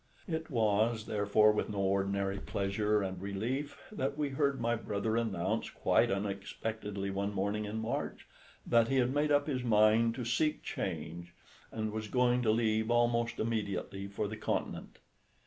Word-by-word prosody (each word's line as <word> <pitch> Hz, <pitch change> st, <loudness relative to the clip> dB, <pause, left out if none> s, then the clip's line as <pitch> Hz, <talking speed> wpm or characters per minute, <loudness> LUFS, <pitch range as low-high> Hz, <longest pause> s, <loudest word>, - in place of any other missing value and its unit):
It 160 Hz, -2 st, -3 dB
was, 110 Hz, -2 st, +2 dB
therefore, 105 Hz, 0 st, +4 dB
with 105 Hz, -, -1 dB
no 105 Hz, -, -4 dB
ordinary 100 Hz, 0 st, 0 dB
pleasure 105 Hz, +2 st, 0 dB
and 95 Hz, -1 st, -4 dB
relief 115 Hz, +9 st, -3 dB
that 140 Hz, -8 st, -2 dB
we 150 Hz, -2 st, 0 dB
heard 140 Hz, -1 st, 0 dB
my 120 Hz, 0 st, +1 dB
brother 110 Hz, -1 st, -2 dB
announce 110 Hz, -2 st, -1 dB
quite -, -, +2 dB
unexpectedly 100 Hz, +1 st, -3 dB
one 100 Hz, +1 st, -2 dB
morning 100 Hz, +2 st, -1 dB
in 105 Hz, +2 st, -4 dB
March 110 Hz, +1 st, -3 dB, 0.4 s
that 115 Hz, -1 st, +4 dB
he 135 Hz, -, 0 dB
had 130 Hz, 0 st, +2 dB
made 150 Hz, +1 st, +1 dB
up 145 Hz, 0 st, +4 dB
his 130 Hz, -5 st, -2 dB
mind 115 Hz, 0 st, +4 dB
to 125 Hz, -2 st, -4 dB
seek 150 Hz, +6 st, +1 dB
change, 85 Hz, 0 st, -5 dB, 0.4 s
and 110 Hz, -1 st, -2 dB
was 110 Hz, 0 st, -4 dB
going 125 Hz, +1 st, +2 dB
to 115 Hz, -, +1 dB
leave 110 Hz, 0 st, +2 dB
almost 120 Hz, -1 st, +2 dB
immediately 100 Hz, -3 st, -2 dB
for 100 Hz, +1 st, -3 dB
the 110 Hz, +2 st, -6 dB
Continent. -, -, -3 dB
110 Hz, 160 wpm, -32 LUFS, 100-120 Hz, 0.4 s, therefore